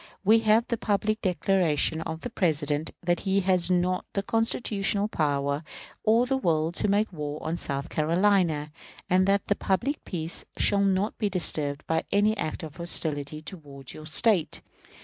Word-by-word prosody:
We 220 +3 +5
have 225 +1 +3
the 235 - -1
public 215 +1 0
declaration 175 -4 +1
of 160 0 -5
the 245 - -6
President 155 -5 0
that 175 0 +1
he 195 0 +1
has 180 -2 +2
not 180 0 +1
the 200 - -1
constitutional 210 -2 0
power 145 -4 -1 0.4
or 225 +3 +4
the 265 +1 0
will 160 -6 +1
to 175 - +1
make 205 0 +1
war 150 -2 -4
on 160 - -2
South 140 -3 -3
Carolina, 165 -2 +1 0.4
and 185 +1 +4
that 200 0 +2
the 205 - +1
public 235 - -1
peace 165 -2 -4
shall 200 -1 +3
not 195 +2 0
be 210 - 0
disturbed 150 -6 -1
by 160 0 -1
any 210 +2 +3
act 160 -5 -4
of 155 -2 -9
hostility 155 -3 0
toward 140 -6 -9
your 155 0 -9
State. 190 0 +3
180 Hz, 165 wpm, -26 LUFS, 155-205 Hz, 0.4 s, We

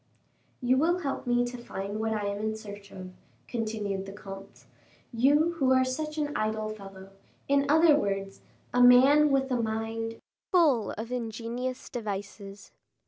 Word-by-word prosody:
"You 255 +1 +3
will 345 +5 +2
help 275 -4 -4
me 245 0 +2
to 245 0 -6
find 200 -2 -5
what 220 0 -1
I 210 -2 -1
am 200 0 -2
in 220 0 -2
search 205 -2 -10
of," 185 -1 -9 0.4
continued 215 -4 -3
the - - -7
comte: 195 -1 -11 0.5
"you 290 +8 +3
who 265 -2 +3
are 260 0 +4
such 305 +4 -4
an 295 -1 -2
idle 215 0 -1
fellow, 195 -2 -10 0.4
in 280 0 +2
other 320 0 +6
words, 195 -6 -2 0.3
a 245 - +3
man 265 +5 +7
with 270 -1 +1
a 245 -2 +1
mind 225 0 -3 0.3
full 305 - +3
of 225 +3 -6
ingenious 240 +2 -4
devices." 200 -2 -6
225 Hz, 155 wpm, -28 LUFS, 205-260 Hz, 0.5 s, man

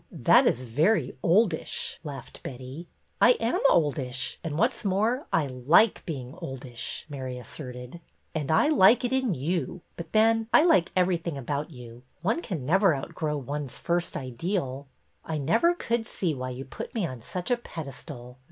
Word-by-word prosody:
That - - +5
is 125 - +1
very 145 - +1
oldish! 180 -1 +1
" - - -38
laughed 140 -5 -8
Betty. 130 +6 -8 0.2
'' - - -41
I 250 - +8
am 230 0 -1
oldish, 135 -5 0
and, 155 -3 -3
what 230 +8 +3
's - - -9
more, 215 +7 0
I 160 -3 +2
like 140 - +3
being 130 -5 -5
oldish," 130 -2 -6
Mary 130 -4 -5
asserted. 125 +3 -8 0.3
And 150 -3 -3
I 160 - +4
like 245 -3 +6
it 245 - -1
in 260 -8 +1
you, 170 +5 -2 0.2
but 170 -2 -7
then, 225 +1 +3
I 310 - +7
like 185 - +4
every 180 -1 +3
thing 165 -3 -5
about 140 +3 -3
you. 120 -4 -11 0.2
One 225 - +1
can 170 - -4
never 190 +2 +4
outgrow 150 +2 -3
one's 140 0 -5
first 170 0 -1
ideal." 135 - -3 0.2
'' - - -43
I 160 - -3
never 225 - +3
could 230 -8 -1
see 175 -5 -1
why 130 -2 -4
you 130 +2 -6
put - - -8
me 215 -5 0
on 130 -7 -6
such 180 - -5
a 245 - +4
pedestal. 140 - -9
160 Hz, 180 wpm, -27 LUFS, 130-195 Hz, 0.3 s, I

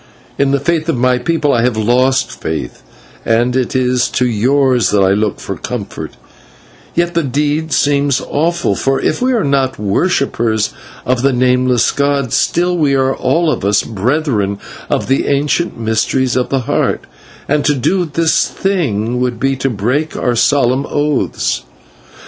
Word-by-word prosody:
In 140 0 +3
the 140 0 +1
faith 165 +3 -1
of 155 - 0
my 125 +1 +2
people 150 +1 0
I 115 - +2
have 120 -2 0
lost 130 +4 +1
faith, 80 -7 -4 0.4
and 120 +2 +1
it 130 -1 -1
is 125 -1 +2
to 125 - 0
yours 125 +2 +2
that 100 -2 +3
I 95 - +3
look 105 +1 0
for - - -5
comfort; - - -6
and - - -23 0.8
yet 175 0 +1
the 170 - +1
deed 150 +3 -1
seems 140 -2 +2
awful, 165 - -1
for 135 +5 0
if 155 - -1
we 255 +1 +2
are 225 -5 +1
not 135 -2 0
worshippers 110 - 0 0.3
of 125 -1 0
the 135 +1 +3
Nameless 125 -1 +2
god, 140 -3 0
still 175 +1 +1
we 145 -5 +2
are 135 0 +1
all 165 -1 +1
of - - -3
us 100 +1 +2
brethren 110 -2 -1 0.3
of - - 0
the 135 - 0
ancient 145 +2 0
mysteries 115 +3 0
of 125 -1 0
the 135 -1 0
Heart, 115 - 0 0.5
and 145 0 +1
to 145 - +3
do 180 +8 0
this 165 +2 +2
thing 125 - -1
would 125 -2 -1
be 135 +1 +1
to 135 +1 -1
break 125 +8 -1
our 120 - 0
solemn 135 +2 +2
oaths. 145 -1 -1
130 Hz, 165 wpm, -15 LUFS, 120-145 Hz, 0.8 s, In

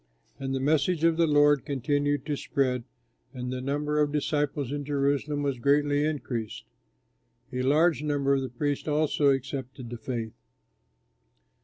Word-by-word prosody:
And 135 0 -2
the - - -1
message 155 +4 +1
of 165 -1 +4
the 165 0 +3
Lord 145 -1 +4
continued 145 0 0
to 150 -1 -1
spread, 130 -4 -1 0.5
and 125 0 -4
the 130 - -4
number 145 +3 -1
of 150 -1 +2
disciples 145 -2 -1
in 145 0 -3
Jerusalem 145 +1 0
was 140 -3 -1
greatly 145 +2 +2
increased. 125 -8 -3 0.9
A 125 - -1
large 150 +4 +3
number 145 -2 +1
of 135 - +2
the 130 - -4
priests 145 +5 -2
also 150 -1 +2
accepted 130 -2 -3
the 120 - -6
faith. 115 -3 -4
145 Hz, 150 wpm, -27 LUFS, 130-150 Hz, 0.9 s, of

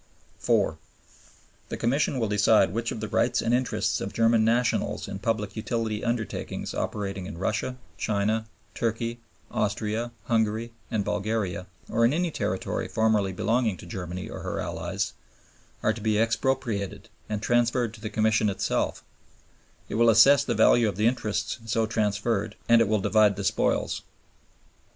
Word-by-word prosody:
The - - -4
Commission 135 +3 +1
will 115 -3 0
decide 100 -2 +4
which 115 +1 -2
of 110 - -5
the 110 - -3
rights 115 +4 +1
and 115 - +1
interests 125 0 0
of - - -4
German 115 -1 +4
nationals 120 +2 +1
in 100 -1 -5
public 105 -2 -2
utility 110 -1 -2
undertakings 120 -2 -3
operating 100 -3 -3
in 95 - -7
Russia, 110 +7 -2 0.2
China, 110 +2 0 0.3
Turkey, 115 +1 -2 0.3
Austria, 110 +3 -1
Hungary, 115 +1 0 0.2
and 105 -3 -1
Bulgaria, 105 -3 -2 0.2
or 115 - +1
in 120 +4 +4
any 175 +1 0
territory - - -2
formerly 110 -3 +2
belonging 110 +2 0
to - - -11
Germany 90 +1 -5
or - - -7
her - - -3
allies, - - -3 0.7
are 110 - +3
to 110 - -8
be 110 0 +1
expropriated 115 -3 -1 0.2
and 105 0 -3
transferred 120 -1 +2
to 115 - -13
the 110 - -4
Commission 110 0 +2
itself; 95 - -1 0.8
it - - -7
will 120 - +6
assess 130 +5 +7
the - - -1
value 115 -3 +5
of 100 - -5
the 105 +3 0
interests 110 -2 0
so 115 0 +1
transferred; 110 0 -1
and 115 0 +6
it 115 - +3
will 105 -1 +1
divide 105 -1 +4
the 100 - -4
spoils. 95 - 0
110 Hz, 150 wpm, -26 LUFS, 105-115 Hz, 0.8 s, assess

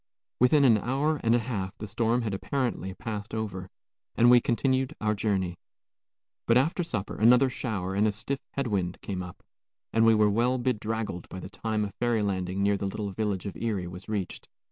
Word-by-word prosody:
Within 140 +3 +5
an 115 -4 +5
hour 140 +7 0
and 115 +1 +4
a 115 -2 0
half 95 -7 -3
the 105 - -6
storm 115 +3 0
had 110 -3 -2
apparently 105 -4 -2
passed 105 -1 -5
over, 95 -4 -4 0.5
and 120 +1 +6
we 125 -1 +7
continued 130 +2 0
our 110 -1 +1
journey. 95 -4 -1 0.9
But 115 - +5
after 160 +7 +2
supper 110 - -3
another 125 +4 +5
shower 95 -7 -3
and 105 +2 +3
a - - +2
stiff 135 +6 -3
head 140 - -1
wind 95 -6 -1
came 95 -2 -3
up, 90 -1 -9 0.5
and 115 - +4
we 115 0 +6
were 105 0 +4
well 120 +4 +2
bedraggled 110 -6 -2
by 95 - -7
the 95 - -9
time 110 0 -1
a 100 - -6
ferry 120 -2 0
landing 95 -1 -1
near 100 0 +3
the 100 - -2
little 100 +1 -4
village 100 -2 -2
of 100 - -5
Erie 105 -6 -2
was 90 +4 -9
reached. 100 -4 -4
110 Hz, 195 wpm, -28 LUFS, 100-120 Hz, 0.9 s, we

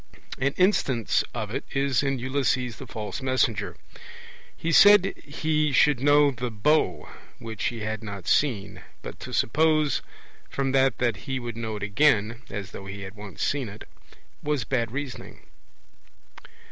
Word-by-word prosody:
An 140 +2 +1
instance 140 - +2
of - - -5
it - - -2
is 135 -2 +2
in 135 -1 0
Ulysses 130 -3 -1
the - - -9
False 110 +4 -5
Messenger: 125 -5 0 0.8
he 165 - -2
said 205 +1 +7
he 155 0 0
should 140 0 +4
know 145 +1 +5
the 125 -1 -4
bow 110 - +1 0.3
which 110 -2 -6
he 115 -2 -2
had 110 0 -3
not 100 -4 -7
seen; 110 -9 +1 0.2
but - - -8
to - - -8
suppose 155 +2 +2 0.5
from 135 -1 -1
that 135 -2 +3
that 120 -3 +1
he 130 -1 -1
would 120 -2 -6
know 110 -2 -4
it 105 - -6
again 115 0 +2
(as 100 -2 -6
though 95 - -9
he 100 +1 -7
had 95 +1 -8
once 105 -4 -7
seen 140 -6 -1
it) 105 +2 -11 0.5
was 150 -4 -1
bad 115 -2 -1
reasoning. 135 0 -7
125 Hz, 155 wpm, -26 LUFS, 110-145 Hz, 0.8 s, said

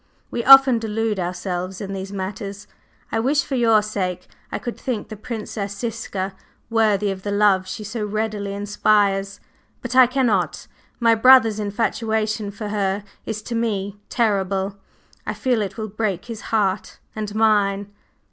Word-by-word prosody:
We 235 - -2
often 270 -2 +8
delude 220 -1 -1
ourselves 180 +1 -3
in 195 -1 -5
these 195 0 -5
matters. 200 +1 -5 0.5
I 225 - 0
wish, 275 +5 +2
for - - -6
your 225 -4 +4
sake, 185 -4 -3 0.3
I - - -2
could 240 - -5
think 235 -5 -4
the 215 - -6
Princess 210 -2 -5
Ziska 205 -4 -4 0.4
worthy 210 -3 +2
of 190 -1 -6
the 205 - -4
love 200 -2 +3
she 215 - -6
so 215 +2 -4
readily 210 -1 -2
inspires. 200 -1 +1 0.4
But, 250 0 -5
I 255 -1 +8
cannot! 245 -8 0 0.3
My 230 -1 +5
brother's 225 -2 +6
infatuation 215 0 -1
for 210 +1 -6
her 200 -1 -1 0.2
is 215 -1 -4
to 240 - -5
me 205 -3 -2
terrible. 195 -4 0 0.5
I - - -2
feel 250 -4 +1
it 200 +1 -4
will 220 -1 -4
break 200 -3 -2
his 230 -2 -7
heart, 200 -3 0 0.2
and 210 -1 -4
mine!" 205 -2 +2
210 Hz, 155 wpm, -22 LUFS, 195-225 Hz, 0.5 s, often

